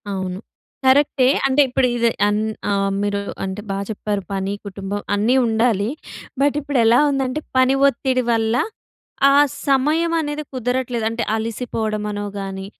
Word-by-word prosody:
అవును. 190 -2 -3 0.5
కరెక్టే. 265 -1 +4 0.2
అంటే, 270 +2 +4
ఇప్పుడీదే 240 -2 +2 0.2
అన్ 210 +1 +1 0.3
ఆహ్, 195 -1 +1
మీరూ 205 0 -1 0.2
అంటే, 190 +2 -4
బా 195 - -2
చెప్పారు, 210 -1 -2
పని, 195 0 -2
కుటుంబం 200 +1 -5
అన్నీ 220 +5 +2
ఉండాలి. 225 -2 +1 0.5
బట్, 285 0 +3
ఇప్పుడెలా 245 -5 +3
ఉందంటే, 270 0 -1 0.2
పని 260 +1 +4
ఒత్తిడి 260 -1 0
వల్ల, 225 0 +1 0.7
ఆ - - +4 0.3
సమయమనేది 305 +2 +1
కుదరట్లేదు. 250 -2 -2
అంటే, 230 +1 -2
అలిసిపోడం 220 -1 -3
అనో 205 0 -4
గానీ, 195 -1 -5
230 Hz, 125 wpm, -20 LUFS, 205-260 Hz, 0.7 s, కరెక్టే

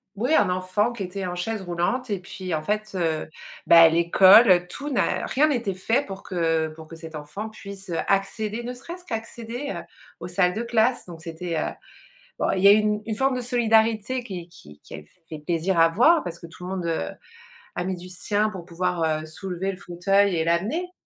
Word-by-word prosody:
oui, 245 +9 0
un 205 -11 +4
enfant 185 +5 0
qui 200 - -5
était 190 +1 -5
en 180 -1 -4
chaise 210 +4 -3
roulante 180 +8 -2
et 200 - -1
puis 185 -1 -6
en 155 - 0
fait, 210 +5 -2
heu, 160 -3 -1 0.4
bah, 165 -1 +9
l'école, 180 +3 +6
tout 285 +9 -6
n'a 265 - 0
rien 300 +4 +2
était 235 -9 -1
fait 225 +9 0
pour 195 -1 -8
que 165 -3 0
pour 155 0 -12
que 165 - -10
cet 160 -1 -10
enfant 150 +9 -6
puisse, 200 -3 -9
heu, 165 - -2
accéder, 210 +3 -1
ne 245 +1 -5
serait-ce 340 +8 -9
qu'à 225 - -3
accéder, 235 +4 -6
heu, - - -5 0.4
aux - - -5
salles 180 0 +2
de 220 - -3
classe. 235 +1 +1
Donc 170 -3 -11
c'était, 165 0 -5
heu - - -1 0.7
bon - - +1
il 190 - -1
y - - +8
a - - +10
une 210 0 +3
une 220 -2 -3
forme 265 +1 +2
de 250 - -2
solidarité 230 0 +2
qui 180 -7 -7
qui 75 - -16
qui - - -14
elle - - -8 0.2
fait 155 -2 -7
plaisir 170 +3 -1
à 165 0 +6
voir. 310 - +4
Parce 170 -1 -6
que 170 - -10
tout 165 +2 -13
le - - -5
monde, 185 -2 -3
heu, 160 - -1 0.7
a 175 - -2
mis 185 0 -2
du 180 +1 -10
sien 205 +3 0
pour 185 -5 -8
pouvoir, 180 -1 -2 0.2
heu, - - -8
soulever 190 +3 -4
le 185 - -9
fauteuil 195 +2 +1
et 160 - +1
l'amener 215 - -1
190 Hz, 215 wpm, -24 LUFS, 170-220 Hz, 0.7 s, a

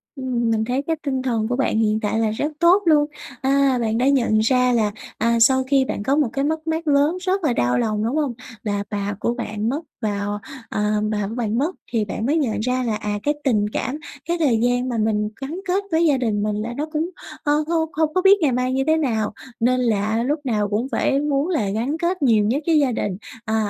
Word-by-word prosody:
Ừm, 250 -3 -1
mình 220 -1 +1
thấy 255 +3 0
cái 325 +3 -1
tinh 265 -2 -1
thần 230 -4 0
của 245 - -1
bạn 255 -4 +1
hiện 215 0 +2
tại 220 0 -1
là 220 -1 +1
rất 295 +8 -2
tốt 360 +4 +5
luôn. 300 -3 +5 0.4
À, 270 -1 +3
bạn 225 0 0
đã 255 +3 +2
nhận 235 -6 +3
ra 250 +2 +3
là, 215 -3 +2 0.3
à, 230 +1 +2
sau 260 +3 +5
khi 265 0 +2
bạn 205 - -4
có 275 +5 +2
một 295 -6 +2
cái 275 - 0
mất 315 +1 -2
mát 320 0 -2
lớn 290 +5 +3
rất 375 0 0
là 265 -6 +2
đau 125 - +1
lòng, 215 -1 0
đúng 240 +6 -1
không? 290 -5 0 0.3
Là 205 -2 -1
bà 205 -1 -2
của 235 - 0
bạn 215 -2 -3
mất 280 +5 -1 0.2
vào 205 -1 -2 0.3
ờ, 210 - -2 0.3
bà 210 -2 -1
của 225 - -6
bạn 230 -2 -1
mất, 315 +7 0 0.2
thì 225 -3 +1
bạn 210 +3 -4
mới 295 +6 +2
nhận 245 -9 0
ra 250 +3 0
là, 225 -3 -1
à, 210 -1 -3
cái 295 - +2
tình 215 -7 +2
cảm, 260 +3 -2 0.3
cái 345 +1 -1
thời 260 -8 +3
gian 245 +2 +1
mà 235 - -2
mình 210 -1 +1
gắn 305 +7 -4
kết 385 +3 +1
với 325 +1 +3
gia 290 -4 +3
đình 215 -5 0
mình 210 -1 -1
là 220 +3 -3
nó 300 - -1
cũng, 315 +3 -1 0.3
ờ, 290 - +2
không 320 -1 0
không 310 0 0
có 370 - +2
biết 395 +1 +7
ngày 290 -5 +3
mai 250 +1 0
như 270 0 +1
thế 315 - +4
nào, 220 -9 0 0.3
nên 255 +2 +2
là 220 0 +1
lúc 290 +5 0
nào 210 -4 0
cũng 220 +5 -1
phải 275 - +1
muốn 290 0 0
là 235 - 0
gắn 235 +9 -1
kết 345 +1 -1
nhiều 220 -6 +4
nhất 275 +8 0
với 320 -2 +4
gia 275 -3 +2
đình, 200 -5 -2 0.3
ờ, 220 - -1
250 Hz, 245 wpm, -22 LUFS, 220-295 Hz, 0.4 s, biết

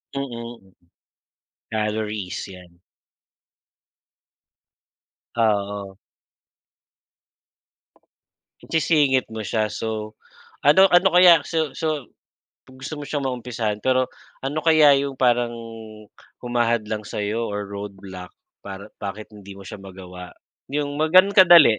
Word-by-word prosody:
Mm. 115 -7 -7 1.0
Calories, 105 -3 -3
yan. 90 -2 -14 2.5
Ah, 110 -2 +3
oo. 100 -1 -6 2.7
Isisingit 145 -6 +2
mo 110 -1 -6
siya, 110 0 0
so 110 0 -5 0.4
ano, 150 +7 +6
ano 180 +2 +6
kaya 175 -3 +8
so 160 -3 -1
so 155 -4 -2 0.7
gusto 130 +4 -8
mo - - -7
siyang 145 -2 -3
maumpisahan, 120 -4 -3
pero 130 -1 +2 0.4
ano 140 +3 -2
kaya 155 -3 +6
yung 140 0 -3
parang 120 -2 +2 0.9
humahadlang 120 -3 -1
sa'yo 105 +3 -2
or 105 0 -4
roadblock 100 -2 -8 0.3
para 100 0 -8 0.2
bakit 105 +2 -6
hindi 100 -1 -11
mo 100 - -10
siya - - -8
magawa, 90 -2 -10 0.4
yung 145 0 -2
mga 160 +4 +5
ganun 200 +1 -4
kadali? 170 - +8
115 Hz, 100 wpm, -22 LUFS, 100-140 Hz, 2.7 s, kaya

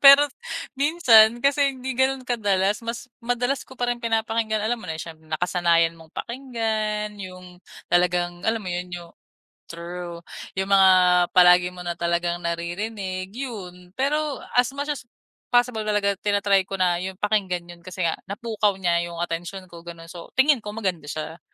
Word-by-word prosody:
Pero 280 +1 +10 0.5
minsan 245 -6 +5
kasi 280 +2 +3
hindi 260 0 -5
gano'n 260 0 +1
kadalas, 205 -3 +1
mas 235 +1 -5 0.2
madalas 245 +3 0
ko 260 - -15
pa 245 - 0
rin 240 0 -2
pinapakinggan, 225 -1 0
alam 215 +3 0
mo 180 - -6
na 160 - -4
eh, - - -4
siyempre 160 -1 -11
nakasanayan 170 0 +2
mong 160 -1 -16
pakinggan, 220 -4 -3
yung 185 -2 -10 0.2
talagang, 175 0 +1
alam 225 +2 +1
mo 205 - -10
yun, 180 0 -3
yung 175 -1 -8 0.6
true, 170 0 -7 0.3
yung 190 - +1
mga 195 -1 +7 0.5
palagi 180 0 +7
mo 180 0 -9
na 175 - -1
talagang 170 0 -1
naririnig, 185 +3 -3
yun. 185 -9 -7
Pero, 290 +4 -1 0.2
as 245 +1 +4
much 285 +1 -4
as - - -10 0.5
possible 245 -3 +2
talaga, 205 -1 +1
tina-try 200 -1 +2
ko 195 0 -6
na 180 -1 +3
yung 190 0 -6
pakinggan 190 -5 0
yun 175 0 -13
kasi 185 0 -8
nga, 170 -2 +1
napukaw 210 +1 0
niya 170 -2 +2
yung 170 - -7
atensyon 175 +2 -4
ko, 170 -1 -12
gano'n. 165 -1 -10
So, 170 -1 -10
tingin 265 -3 +3
ko 210 - -5
maganda 190 -7 -2
siya. 155 +3 -6
195 Hz, 165 wpm, -24 LUFS, 175-235 Hz, 0.6 s, Pero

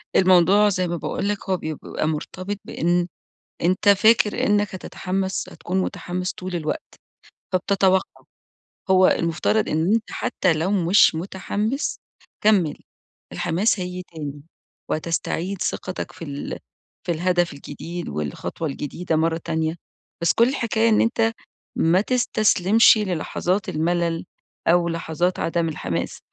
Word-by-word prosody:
الموضوع 185 +3 +5
زي 185 -2 0
ما 170 0 -2
باقول 200 - -2
لك 205 -2 -4
هو 185 - +2
بيبقى 155 -1 -4
مرتبط 185 +6 -4
بإن 175 +1 0 0.6
أنت 185 +4 +2
فاكر 210 +1 +4
إنّك 205 -1 +1
هتتحمس 190 +1 -3
هتكون 190 +2 -3
متحمس 180 0 -3
طول 185 -1 -5
الوقت، 170 - -4 0.6
فبتتوقع 190 0 +1 0.7
هو 185 0 +6
المفترض 170 +6 +1
إن 160 +7 +1
أنت 225 -1 0
حتى 180 -4 0
لو 165 +5 -1
مش 185 -2 +5
متحمس 205 - -2 0.4
كمّل 190 -8 +3 0.6
الحماس 190 +5 +1
هييجي 180 0 -4
تاني. 145 -3 -7 0.5
وهتستعيد 170 +4 -2
ثقتك 185 - -3
في 165 - -9
ال 140 -1 -5 0.5
في 175 - 0
الهدف 175 0 +1
الجديد 165 +4 -7
والخطوة 75 - -4
الجديدة 160 +4 -3
مرّة 165 +1 +1
تانية، 160 0 -1 0.5
بس 170 - +3
كل 235 +2 +4
الحكاية 230 -4 +1
إن 215 - +4
أنت 230 -1 +2 0.4
ما 170 +4 +3
تستسلمش 220 -3 +4
للحظات 185 0 -1
الملل 170 +1 0 0.4
أو 170 0 +4
لحظات 165 +2 -1
عدَم 165 0 0
الحماس 155 - -3
180 Hz, 125 wpm, -23 LUFS, 165-200 Hz, 0.7 s, هو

